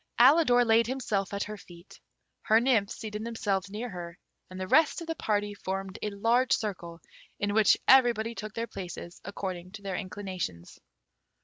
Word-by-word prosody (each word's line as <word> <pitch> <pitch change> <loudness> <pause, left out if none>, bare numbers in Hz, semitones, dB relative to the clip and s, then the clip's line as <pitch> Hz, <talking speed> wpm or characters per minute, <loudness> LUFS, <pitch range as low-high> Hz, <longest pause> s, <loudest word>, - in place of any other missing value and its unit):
Alidor 250 -2 +6
laid 225 0 +4
himself 220 -7 -2
at 200 0 -2
her 210 0 -7
feet. 175 -1 -15 0.4
Her 220 +1 +4
nymphs 230 -5 +2
seated 215 -1 -6
themselves 205 -4 -2
near 215 +5 -5
her, 175 -4 -8 0.3
and 185 0 -9
the 185 - -3
rest 315 +7 +4
of 335 - -7
the 325 - -2
party 205 -8 -1
formed 195 -1 -5
a 210 - -1
large 235 +6 +2
circle, 175 -6 -3 0.4
in 205 0 -1
which 215 -1 +5
everybody 235 -4 +5
took 215 -2 -7
their 230 - -2
places 180 -4 -8
according 185 -2 -6
to 210 -2 -10
their 195 -2 -3
inclinations. 185 - -6
205 Hz, 170 wpm, -29 LUFS, 190-230 Hz, 0.4 s, Alidor